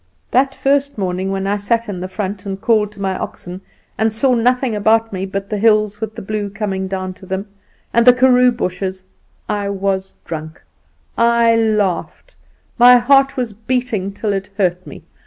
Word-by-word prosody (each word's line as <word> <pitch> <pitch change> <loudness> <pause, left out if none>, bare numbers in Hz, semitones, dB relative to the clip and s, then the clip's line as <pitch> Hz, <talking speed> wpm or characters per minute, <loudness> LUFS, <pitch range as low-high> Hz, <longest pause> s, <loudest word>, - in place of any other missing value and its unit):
"That 270 +2 +2
first 280 0 0
morning, 190 -1 -2
when 195 0 -2
I 200 +1 0
sat 230 +3 -1
in 195 -3 -5
the 185 - -4
front 190 +1 -5
and 195 0 -4
called 215 -1 +2
to 205 - -15
my 190 -1 -1
oxen, 180 +1 -7 0.4
and 220 0 +2
saw 250 +4 +2
nothing 250 0 +1
about 220 +1 +2
me 190 +1 -3
but 195 +1 -4
the 210 - -1
hills, 210 -1 +2
with 220 -1 -4
the - - -7
blue 210 0 -3
coming 195 -2 -3
down 185 -1 -4
to 190 - -15
them, 190 +2 -3 0.5
and 235 +1 +3
the - - +12
karoo 250 0 +4
bushes, 185 -4 -4 0.4
I 205 -1 -2
was 195 -1 -2
drunk; 160 -1 -7 0.6
I 235 0 +4
laughed; 215 - -1 0.5
my 245 +1 +8
heart 270 +2 +3
was 245 -4 -2
beating 225 -3 -2
till 205 +1 -2
it 195 0 -4
hurt 180 -2 0
me. - - -11
210 Hz, 180 wpm, -18 LUFS, 190-235 Hz, 0.6 s, the